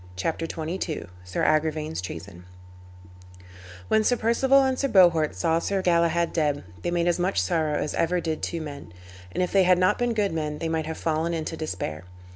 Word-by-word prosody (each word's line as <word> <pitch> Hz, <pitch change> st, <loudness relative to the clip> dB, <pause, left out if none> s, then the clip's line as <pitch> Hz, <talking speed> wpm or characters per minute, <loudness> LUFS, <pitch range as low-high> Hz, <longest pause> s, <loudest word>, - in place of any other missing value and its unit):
CHAPTER 165 Hz, -, -2 dB
XXII 165 Hz, 0 st, -4 dB, 0.2 s
SIR 90 Hz, 0 st, -3 dB
AGRIVAIN'S 155 Hz, -, 0 dB
TREASON 90 Hz, 0 st, -8 dB, 1.4 s
When 220 Hz, -, +3 dB
Sir 245 Hz, +3 st, +2 dB
Perceval 265 Hz, +5 st, +3 dB
and 260 Hz, -1 st, 0 dB
Sir 275 Hz, -, +1 dB
Bohort 170 Hz, -, +4 dB
saw 160 Hz, -, +1 dB
Sir 195 Hz, +2 st, -1 dB
Galahad 170 Hz, -1 st, +2 dB
dead 150 Hz, -3 st, 0 dB, 0.2 s
they -, -, -2 dB
made 175 Hz, 0 st, 0 dB
as 175 Hz, 0 st, +1 dB
much 185 Hz, +2 st, +1 dB
sorrow 160 Hz, -4 st, 0 dB
as 150 Hz, -, -2 dB
ever 175 Hz, +2 st, +1 dB
did 160 Hz, -2 st, -3 dB
two 170 Hz, -, -3 dB
men. 140 Hz, -, -8 dB, 0.4 s
And 180 Hz, -, 0 dB
if 180 Hz, -, -2 dB
they 195 Hz, -, +4 dB
had 180 Hz, -1 st, +5 dB
not 185 Hz, +1 st, +2 dB
been 245 Hz, -1 st, 0 dB
good 205 Hz, -4 st, +1 dB
men 150 Hz, -2 st, -2 dB
they 165 Hz, -, -3 dB
might 160 Hz, -1 st, -1 dB
have 160 Hz, -, -4 dB
fallen 165 Hz, +1 st, -1 dB
into 160 Hz, 0 st, -4 dB
despair. 90 Hz, -, -5 dB
165 Hz, 190 wpm, -25 LUFS, 155-185 Hz, 1.4 s, had